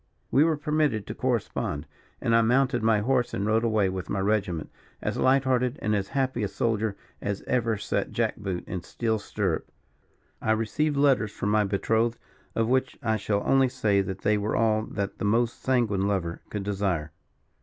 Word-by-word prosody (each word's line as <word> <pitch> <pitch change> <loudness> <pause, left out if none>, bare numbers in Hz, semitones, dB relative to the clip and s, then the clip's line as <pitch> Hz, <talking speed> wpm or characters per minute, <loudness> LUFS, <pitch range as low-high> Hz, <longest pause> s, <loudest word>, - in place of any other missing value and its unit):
We 140 - +5
were 160 -1 +2
permitted 150 -7 0
to 105 - -5
correspond, 110 - -2 0.4
and 115 - +2
I 115 - +6
mounted 125 +1 +2
my 110 -1 +3
horse 125 +1 +1
and 100 - -1
rode 110 +2 +2
away 110 -4 +2
with 95 -1 -4
my 100 - -1
regiment, 95 -5 0 0.3
as - - -2
light 135 +1 +3
hearted 125 0 +1
and 110 0 0
as 100 -1 -1
happy 130 -2 -1
a 105 - +1
soldier 110 -1 -1 0.2
as 100 -1 -3
ever 115 -3 0
set 105 - -2
jack - - 0
boot 95 -4 -4
in 95 - -4
steel 110 +4 -1
stirrup. 100 -5 -2 0.7
I 110 - +2
received 140 +7 0
letters 135 -7 +3
from 105 - -3
my 105 0 +3
betrothed, 110 +4 +1 0.4
of 115 0 +1
which 130 +1 +1
I 110 -2 +2
shall 100 0 -1
only 135 -1 +4
say 110 -6 +2
that 95 0 -5
they 105 0 +2
were 105 +2 -1
all 110 -1 +2
that 100 -1 -4
the - - -1
most 115 +3 +1
sanguine 110 -7 +1
lover 90 -4 -2
could 105 -2 -4
desire. 95 -6 -1
110 Hz, 185 wpm, -27 LUFS, 100-125 Hz, 0.7 s, I